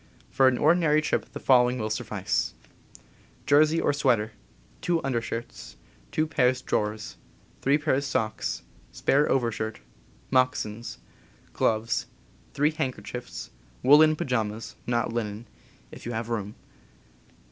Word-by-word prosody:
For 135 Hz, -1 st, +4 dB
an 130 Hz, -1 st, +3 dB
ordinary 155 Hz, 0 st, +4 dB
trip 155 Hz, -, -1 dB
the -, -, -6 dB
following 125 Hz, -1 st, +4 dB
will 110 Hz, -2 st, -3 dB
suffice: -, -, -2 dB, 0.9 s
Jersey 155 Hz, +3 st, +4 dB
or -, -, +2 dB
sweater, 120 Hz, -7 st, +1 dB, 0.5 s
two 170 Hz, -1 st, +1 dB
undershirts, 120 Hz, -, -4 dB, 0.4 s
two 155 Hz, -, +1 dB
pairs 130 Hz, -4 st, +1 dB
drawers, 105 Hz, 0 st, -2 dB, 0.4 s
three 140 Hz, +2 st, +3 dB
pairs 140 Hz, -2 st, 0 dB
socks, 110 Hz, -4 st, -2 dB, 0.3 s
spare 145 Hz, +2 st, +2 dB
overshirt, 115 Hz, -4 st, -1 dB, 0.5 s
moccasins, 120 Hz, -3 st, 0 dB, 0.6 s
gloves, 110 Hz, +1 st, 0 dB, 0.5 s
three 150 Hz, +2 st, +3 dB
handker 130 Hz, -8 st, -3 dB
chiefs, 125 Hz, +4 st, -7 dB, 0.3 s
woolen 155 Hz, +3 st, +7 dB
pyjamas 115 Hz, -5 st, -2 dB
(not 120 Hz, -1 st, 0 dB
linen), 110 Hz, -1 st, -3 dB, 0.5 s
if -, -, -10 dB
you 120 Hz, -, -3 dB
have 115 Hz, +1 st, -3 dB
room. 105 Hz, -2 st, -3 dB
125 Hz, 115 wpm, -27 LUFS, 110-145 Hz, 0.9 s, woolen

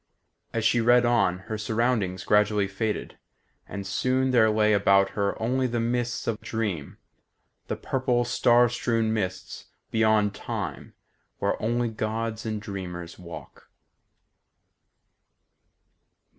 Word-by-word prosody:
As 115 Hz, -1 st, -2 dB
she 115 Hz, +1 st, +3 dB
read 120 Hz, +1 st, +5 dB
on, 115 Hz, -7 st, +2 dB
her 110 Hz, -1 st, -4 dB
surroundings 110 Hz, -3 st, 0 dB
gradually 105 Hz, -1 st, +3 dB
faded, 105 Hz, +3 st, -3 dB, 0.5 s
and 100 Hz, 0 st, -6 dB
soon 130 Hz, +6 st, +1 dB
there 115 Hz, -3 st, +5 dB
lay 105 Hz, 0 st, +3 dB
about 100 Hz, -1 st, +4 dB
her 100 Hz, -1 st, -1 dB
only 130 Hz, +3 st, +1 dB
the 120 Hz, -1 st, -2 dB
mists 120 Hz, +1 st, -1 dB
of 115 Hz, -2 st, -2 dB
dream; 100 Hz, -10 st, -3 dB, 0.7 s
the -, -, -2 dB
purple, 125 Hz, -2 st, 0 dB
star 120 Hz, 0 st, +4 dB
strown 115 Hz, -2 st, 0 dB
mists 95 Hz, -4 st, -4 dB, 0.3 s
beyond 110 Hz, -2 st, +3 dB
Time, -, -, -5 dB, 0.4 s
where -, -, -1 dB
only 120 Hz, +2 st, 0 dB
gods 110 Hz, 0 st, -3 dB
and 110 Hz, -1 st, -2 dB
dreamers 90 Hz, -5 st, -7 dB
walk. 85 Hz, -1 st, -11 dB
110 Hz, 115 wpm, -26 LUFS, 100-120 Hz, 0.7 s, read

